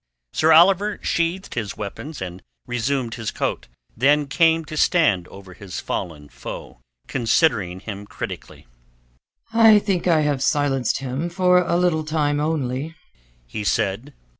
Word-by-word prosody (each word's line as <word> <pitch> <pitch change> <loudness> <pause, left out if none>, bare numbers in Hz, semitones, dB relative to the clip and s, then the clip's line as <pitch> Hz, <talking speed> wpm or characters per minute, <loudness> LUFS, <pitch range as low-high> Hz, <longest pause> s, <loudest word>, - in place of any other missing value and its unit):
Sir 160 +1 +3
Oliver 195 +5 +5
sheathed 170 +3 -1
his 110 -4 -4
weapons 120 +7 -6
and 90 0 -8 0.2
resumed 120 0 -2
his 115 -3 -4
coat, - - -3 0.3
then 145 +5 +3
came 165 +3 +2
to 155 - -7
stand 150 - +2
over 95 -1 -12
his 95 +1 -7
fallen 75 -4 -5
foe, - - -9 0.3
considering 115 - +1
him 100 -1 -7
critically. - - -8 0.9
"I 225 -2 +7
think 195 -4 -1
I 165 -3 +4
have 145 -3 0
silenced 135 -4 +1
him 135 +6 -3
for 180 0 +3
a 175 -1 0
little 175 -3 +1
time 150 -2 0
only," 150 0 -2 0.5
he 80 - -6
said. 105 +7 -1
145 Hz, 140 wpm, -22 LUFS, 110-165 Hz, 0.9 s, I